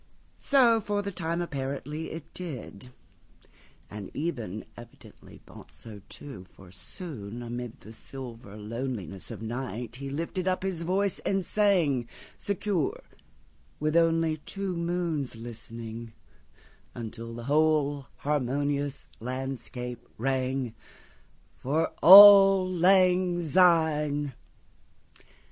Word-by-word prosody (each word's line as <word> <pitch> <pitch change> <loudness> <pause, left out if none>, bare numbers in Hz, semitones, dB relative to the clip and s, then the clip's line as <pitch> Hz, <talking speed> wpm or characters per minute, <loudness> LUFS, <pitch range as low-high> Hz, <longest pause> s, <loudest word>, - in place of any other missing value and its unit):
So, 240 -5 +4
for 205 0 -2
the 200 - -4
time, 170 -1 -2
apparently 145 +1 -5
it 160 -1 -9
did, 125 - -8 1.0
And 105 -2 -8
Eben 120 - -4
evidently 120 0 -14
thought - - -14
so 105 -3 -12
too; 130 -10 -10
For 95 -2 -16
soon 120 - -8
amid 120 0 -6
the 110 - -12
silver 115 -3 -9
lonelinessOf 110 -4 -6
night 120 0 -5
he 140 +1 -6
lifted 170 +6 -3
up 185 0 0
his 190 -4 -2
voice 190 +3 0
and 195 -2 -1
sang, 165 - +2 0.3
Secure, 200 -5 -2 0.8
with 155 +1 -1
only 165 -1 +3
two 195 +4 -5
moons 170 -6 -2
listening, 115 0 -9 0.8
Until 115 0 -7
the 120 - -7
whole 145 -1 +1
harmonious 145 0 -1
landscape 125 -1 -5
rang—"For 130 - -4
auld 195 -1 +10
lang 180 -1 +4
syne." 155 -4 +2
145 Hz, 100 wpm, -28 LUFS, 120-175 Hz, 1.0 s, auld